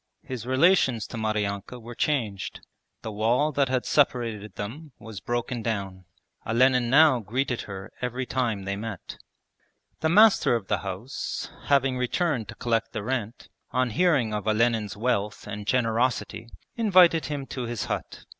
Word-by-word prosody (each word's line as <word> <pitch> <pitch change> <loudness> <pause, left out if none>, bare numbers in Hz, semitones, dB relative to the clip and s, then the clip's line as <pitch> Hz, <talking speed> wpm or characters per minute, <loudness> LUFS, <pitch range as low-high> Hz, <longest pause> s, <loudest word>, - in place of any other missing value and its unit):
His 125 -3 -6
relations 130 - +3
to - - -9
Maryanka 105 +1 -2
were 120 +1 -9
changed. 115 -9 -2 0.4
The 110 - -4
wall 120 +8 +1
that 140 -2 +1
had 130 -1 0
separated 115 -7 0
them 140 +8 -7
was 110 -4 -9
broken 120 +1 -2
down. 100 -4 -4 0.4
Olenin 125 +1 +3
now 145 -1 +6
greeted 125 +4 -2
her 95 -1 -7
every 125 +1 -2
time 115 -6 -1
they 100 +1 -2
met. 105 -2 -7 0.8
The 160 - +1
master 210 - +5
of 105 -5 -4
the - - +1
house 100 +7 -5
having 135 -2 +2
returned 125 - 0
to - - -7
collect 115 -1 -1
the 110 -3 -3
rent, 120 -1 -4 0.2
on 130 -1 0
hearing 145 -8 +2
of 105 0 -3
Olenin's 110 -2 +1
wealth 105 -2 -1
and 105 0 -7
generosity 120 0 0 0.3
invited 185 -7 +5
him 145 -2 -4
to 125 -2 -3
his 120 -2 -3
hut. - - -5
120 Hz, 150 wpm, -26 LUFS, 110-130 Hz, 0.8 s, now